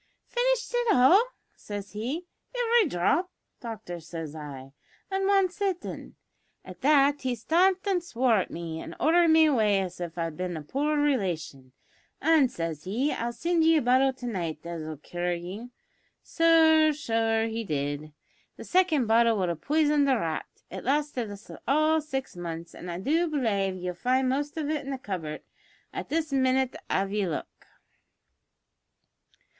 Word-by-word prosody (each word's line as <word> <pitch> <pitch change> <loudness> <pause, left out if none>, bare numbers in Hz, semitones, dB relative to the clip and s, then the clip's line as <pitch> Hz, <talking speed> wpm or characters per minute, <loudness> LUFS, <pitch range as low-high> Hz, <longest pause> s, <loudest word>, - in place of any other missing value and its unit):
`Finished - - +1
it 485 -2 +2
all?' 360 - +6 0.3
says 205 -1 -7
he. 255 - -4 0.3
`Ivery 470 -6 +3
dhrop, 295 - +1 0.3
doctor,' 220 -7 -7
says 165 -2 -7
I, 135 -3 -9 0.4
`at 385 0 0
wan 395 -1 +4
sittin'.' 375 -1 -4 0.5
At 185 -1 -11
that 285 0 +4
he 255 -2 -1
stamped 365 - +2
an' 375 -3 +2
swore 250 -8 +1
at 190 - -1
me, 165 -1 -6
an' - - -8
ordered 340 +2 +4
me 320 0 +6
away 215 -9 +3
as 180 -2 -5
if 170 -1 -5
I'd 165 -2 -3
bin 180 -2 -3
a 155 - -7
poor 295 - -1
relation; 180 - -1 0.5
an' 310 -3 +4
says 165 - -5
he, 245 +10 0
`I'll 235 +1 -2
sind 335 +6 0
ye 325 0 +5
a - - +2
bottle 260 +2 +4
to 255 -1 -10
night 170 -8 -4
as'll 160 -2 -5
cure 175 +4 -3
ye!' 185 +8 -7 0.6
Sure 320 -2 +5
so 225 -5 0
he 225 0 -3
did. 145 -3 -3 0.5
The - - -8
second 355 -8 +2
bottle 230 0 +4
would 185 -3 0
have 165 -2 -4
poison'd 295 -2 +2
a 265 - +4
rat. 165 -6 -3 0.2
It 190 - -6
lasted 275 -4 -1
us 205 0 -10 0.2
all 310 +3 +3
six 270 -7 -5
months, 170 -1 -6
an' 180 - -9
I 170 - -4
do 320 - +1
belave 210 - 0
ye'll 180 0 -4
find 255 +7 +1
the - - +2
most 290 +2 -4
of 305 -2 -2
it 305 -1 -1
in 275 - -7
the 270 - -2
cupboard 175 -10 -5 0.5
at - - -5
this 315 -1 -1
minnit 260 -1 +2
av 195 +1 0
ye 205 -2 0
look." 160 - -6
245 Hz, 165 wpm, -27 LUFS, -, 0.6 s, all